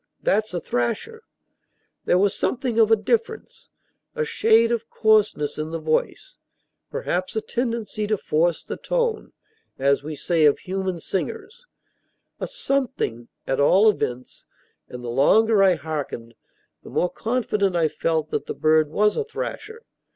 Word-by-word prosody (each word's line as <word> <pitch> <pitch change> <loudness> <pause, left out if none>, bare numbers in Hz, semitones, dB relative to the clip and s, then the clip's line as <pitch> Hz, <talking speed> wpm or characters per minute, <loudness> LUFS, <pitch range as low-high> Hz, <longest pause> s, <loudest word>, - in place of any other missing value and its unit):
that's 220 - +1
a 175 - -2
thrasher!" 305 - -2 0.8
There 180 - +3
was 200 +1 +2
a - - -10
something 245 -3 -1
of 220 -1 +4
difference: 455 -1 -2 0.5
a 470 -1 -1
shade 230 - +3
of 230 -1 -2
coarseness 210 -10 +2
in 155 +1 -3
the 165 - -3
voice, 155 -1 -2 0.5
perhaps; 185 +4 -3
a - - +2
tendency 230 -4 -3
to 215 0 +1
force 165 0 0
the - - -6
tone, 480 -3 -1 0.5
as 140 +1 +2
we 155 +1 -6
say 160 +2 +1
of 145 - +5
human 190 -2 -3
singers, 450 - -5 0.7
a - - -3
something, 265 - -2 0.2
at 135 - -1
all 190 +9 +5
events, 125 -9 -5 0.4
and 125 0 -8
the - - -6
longer 210 - +4
I 190 -2 +5
hearkened, 145 -7 -5 0.5
the - - -12
more 180 - 0
confident 210 -5 -1
I 165 -2 +3
felt 160 0 -2
that - - -2
the - - -4
bird 155 -1 +3
was 210 +6 +2
a - - 0
thrasher. 445 0 -6
195 Hz, 150 wpm, -23 LUFS, 155-235 Hz, 0.8 s, of